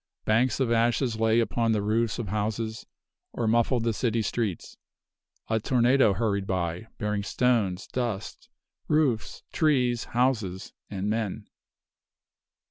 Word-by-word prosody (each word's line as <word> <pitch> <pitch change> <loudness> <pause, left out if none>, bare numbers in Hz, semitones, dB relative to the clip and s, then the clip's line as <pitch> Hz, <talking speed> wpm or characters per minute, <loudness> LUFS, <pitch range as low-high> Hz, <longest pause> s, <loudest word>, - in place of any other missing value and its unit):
Banks 120 +5 +2
of 130 -3 +1
ashes 115 0 +1
lay 115 +1 +3
upon 115 0 +1
the 105 - +1
roofs 110 +2 0
of 115 -5 -4
houses, 110 +2 -3 0.5
or 120 - -2
muffled 115 +1 +2
the 115 -1 +1
city 115 0 0
streets. 105 -6 -3 0.7
A 110 0 +1
tornado 125 -1 +3
hurried 100 -2 -1
by, 90 +2 -2
bearing 105 -1 -1
stones, 105 -4 +1
dust, 115 -5 -4 0.4
roofs, 145 -8 0
trees, 125 -7 +2
houses, 115 -7 -1 0.2
and 100 0 -3
men. 110 -2 -2
115 Hz, 125 wpm, -27 LUFS, 105-120 Hz, 0.7 s, lay